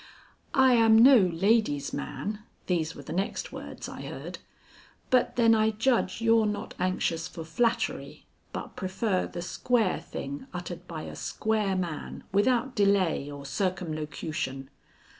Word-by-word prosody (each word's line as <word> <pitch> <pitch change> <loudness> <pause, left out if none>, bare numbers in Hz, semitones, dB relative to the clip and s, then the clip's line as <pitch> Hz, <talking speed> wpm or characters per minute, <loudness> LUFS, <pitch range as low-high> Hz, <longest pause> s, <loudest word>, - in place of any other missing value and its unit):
"I 265 -1 +6
am 225 -2 +6
no 260 +4 +9
lady's 185 -5 +2
man," 210 0 -4 0.3
these 165 -3 -1
were - - -9
the - - -6
next 190 +3 -2
words - - -7
I - - -8
heard, - - -7 0.7
"but 255 -1 +3
then 230 -2 +5
I 220 0 +4
judge 225 +2 +1
you're 225 -1 +4
not 210 0 -4
anxious 180 -3 0
for 165 - -8
flattery, 230 +9 -1 0.3
but - - -6
prefer 190 +1 -1
the 175 - -6
square 225 +1 +1
thing 280 -1 -7
uttered 175 0 -6
by 160 -2 -6
a - - -7
square 215 -3 -1
man 175 -5 -4
without 240 +5 +2
delay 200 -8 +2
or 140 -1 -8
circumlocution. 155 -5 -3
195 Hz, 140 wpm, -28 LUFS, 170-225 Hz, 0.7 s, no